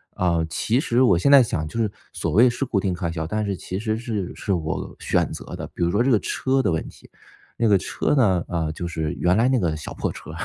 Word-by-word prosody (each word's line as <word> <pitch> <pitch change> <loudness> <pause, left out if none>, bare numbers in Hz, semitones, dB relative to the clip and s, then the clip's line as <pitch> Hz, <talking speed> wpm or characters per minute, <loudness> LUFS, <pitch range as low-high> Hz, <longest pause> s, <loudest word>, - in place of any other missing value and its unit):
啊， 85 -2 +1
其 115 - 0
实 120 -4 +1
我 125 -9 +5
现 95 +11 +2
在 140 -1 +9
想 80 -10 -1
就 80 +10 -5
是 110 -2 +1 0.2
所 - - -3
谓 120 +5 +6
是 120 +3 -2
固 115 - -1
定 95 -2 0
开 85 -1 -3
销， 80 -1 -3
但 105 +6 -2
是 100 -1 -2
其 90 +1 -5
实 110 0 -1
是 110 -6 -4
是 100 - -4
我 80 -4 -2
选 - - 0
择 - - -7
的， - - -6
比 - - -10
如 85 - +3
说 105 +7 +2
这 135 - +2
个 110 - +4
车 135 +7 0
的 105 - +1
问 80 - -2
题。 - - -17 0.5
那 115 - +1
个 100 - +6
车 95 - -1
呢， 95 -10 +3
啊， 80 -2 -1
就 85 - -5
是 80 -3 -3
原 90 +2 +1
来 115 +3 +3
那 130 0 +3
个 85 -6 0
小 75 - -7
破 - - -2
车 - - -10
100 Hz, 280 characters per minute, -23 LUFS, 85-120 Hz, 0.5 s, 在